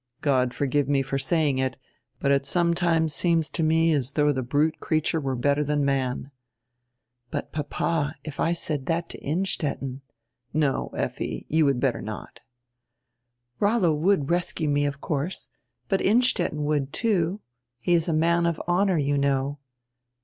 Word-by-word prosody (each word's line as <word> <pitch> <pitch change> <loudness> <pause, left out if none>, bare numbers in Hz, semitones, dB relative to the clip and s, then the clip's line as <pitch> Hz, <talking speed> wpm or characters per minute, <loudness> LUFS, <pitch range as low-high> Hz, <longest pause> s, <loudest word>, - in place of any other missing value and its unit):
God 130 -3 +2
forgive 140 +1 0
me 140 -1 +2
for 135 +1 -2
saying 145 -1 +1
it, 130 0 -1 0.4
but 140 - +1
it 140 0 +3
sometimes 170 0 +1
seems 165 -2 +1
to - - -2
me 160 +1 +3
as 140 -2 -1
though 150 -1 +3
die 130 - -2
brute 145 +5 +1
creature 155 0 0
were 135 -2 -1
better 140 +4 +1
dian 145 0 0
man." 135 0 -1 1.0
"But, - - -4
papa, 150 0 -1
if 155 -2 -8
I 165 - +2
said 155 -4 -2
diat 165 +2 -1
to - - -7
Innstetten 145 -5 -2 0.2
— 115 +1 -56
" 125 - -45
"No, 150 -3 +1
Effi, - - -3
you 160 0 +3
would 135 -3 +2
better 130 -1 0
not." 110 0 -7 1.2
"Rollo 205 -6 +3
would 160 -1 +1
rescue 175 -3 0
me, 145 0 +2
of 140 -1 -5
course, 155 +5 -3 0.4
but 195 - +1
Innstetten 190 -9 +2
would, 145 -2 0
too. 200 -4 0 0.4
He 175 +9 +1
is 165 -1 +2
a - - +2
man 170 +2 +2
of 165 -2 -1
honor, 185 +1 +2
you 145 -1 +1
know." 140 0 0
150 Hz, 165 wpm, -25 LUFS, 140-170 Hz, 1.2 s, it